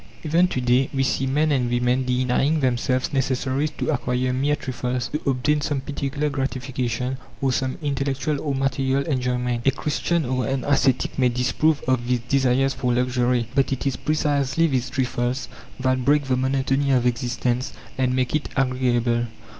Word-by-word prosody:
Even 170 +3 +3
to 130 - -2
day 125 +1 +2
we 135 - +2
see 135 0 0
men 150 +3 +2
and 125 -4 +1
women 125 +1 +1
denying 130 +4 +1
themselves 130 +1 0
necessaries 135 +2 0
to - - -1
acquire 125 +1 -1
mere 140 +3 +1
trifles, 125 -3 -3
to 150 - -3
obtain 145 +3 +1
some 145 -1 -1
particular 140 +1 -3
gratification, 130 -2 -2 0.2
or 135 0 +1
some 130 +1 -1
intellectual 140 +1 -1
or 145 -3 -1
material 135 0 0
enjoyment. 125 -4 -1
A 135 - +4
Christian 155 +3 -1
or 130 0 -1
an 135 -1 -1
ascetic 135 -2 +1
may 125 -1 +4
disapprove 135 +5 +1
of 130 -2 +1
these 125 -1 +1
desires 135 +1 +2
for 125 0 -1
luxury; 125 -1 +1
but 135 -1 +2
it 135 - -2
is 135 - +1
precisely 150 0 +1
these 135 -4 0
trifles 125 0 -1 0.3
that 130 0 +1
break 145 +2 +3
the 130 -1 0
monotony 135 +1 0
of 125 -2 +3
existence 125 +1 -1 0.2
and 130 -1 +1
make 130 +2 0
it 155 - -1
agreeable. 125 -3 +1
130 Hz, 165 wpm, -23 LUFS, 125-140 Hz, 0.3 s, A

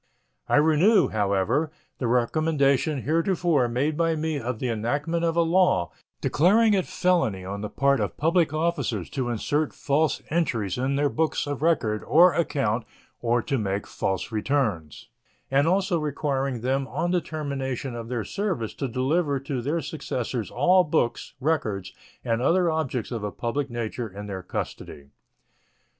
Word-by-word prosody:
I - - +3
renew, 160 +8 +4
however, 105 +9 +1 0.3
the 125 - -1
recommendation 140 +3 +1
heretofore 165 -3 +2
made 135 +6 0
by 165 0 +1
me 155 -1 -2
of 120 -1 -3
the 125 - -2
enactment 145 +9 -1
of 165 -1 +1
a 170 - +4
law 165 - +2 0.3
declaring 210 +8 +4
it 190 -3 +1
felony 135 - +1
on 100 +2 -5
the 105 - -4
part 140 0 +2
of - - -2
public 165 0 +2
officers 170 +2 -1
to 130 -4 -2
insert 145 +6 -1
false 150 +2 0
entries 120 - 0
in 135 +2 0
their 145 +1 +2
books 160 +2 0
of 145 -1 -4
record 125 -10 +1
or 175 +4 +6
account 125 -9 0 0.4
or 120 0 +1
to 135 -4 -1
make 100 -1 -2
false 95 +4 -3
returns, 110 - -1 0.4
and 140 +3 +3
also 185 -1 +2
requiring 140 -4 -2
them 135 +2 0
on 175 +5 -2
the 180 -1 +2
termination 135 -5 -4
of 115 -1 -6
their 120 -3 -2
service 180 - -3
to 135 - -3
deliver 140 +4 0
to 135 -2 -3
their 150 +7 -1
successors 125 - -4
all 185 +1 +4
books, 150 -7 -1
records, 115 - -1 0.3
and 115 -1 0
other 170 +5 +3
objects 135 -8 -2
of 115 -4 -4
a 105 - -1
public 135 +6 -2
nature 120 0 -4
in 100 +2 -8
their 95 -2 -5
custody. 70 -5 -6
140 Hz, 155 wpm, -25 LUFS, 115-160 Hz, 0.4 s, or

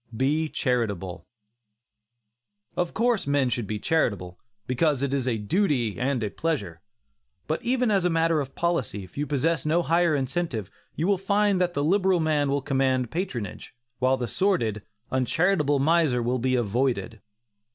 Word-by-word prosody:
BE 150 +5 +1
CHARITABLE. 100 - -2 1.5
Of 175 -1 -2
course 230 - +1
men 140 -3 +2
should 120 -3 -2
be 105 - -2
charitable, 100 - -1 0.3
because 135 +2 +1
it 140 -1 -1
is 135 -2 -1
a 120 -3 +1
duty 125 - 0
and 130 -2 0
a 105 - -2
pleasure. 100 - -3 0.6
But 155 - -2
even 250 -2 +1
as 195 -3 +2
a 180 - +2
matter 165 -1 +2
of 135 -1 -7
policy, 150 - -1
if 90 - -15
you 145 +1 -2
possess 150 +2 0
no 165 +3 +2
higher 170 -1 +2
incentive, 130 - -2 0.2
you 160 - -1
will 195 -1 +2
find 200 0 +2
that 175 -1 0
the 145 - 0
liberal 190 +2 +3
man 150 -3 +1
will 140 0 0
command 130 -3 +1
patronage, 135 - -5 0.2
while 130 +1 +2
the 125 -2 -3
sordid, 115 - 0 0.3
uncharitable 145 +4 +2
miser 145 -4 +2
will 125 +2 0
be 130 +2 +1
avoided. 120 -1 -1
140 Hz, 160 wpm, -26 LUFS, 120-170 Hz, 1.5 s, liberal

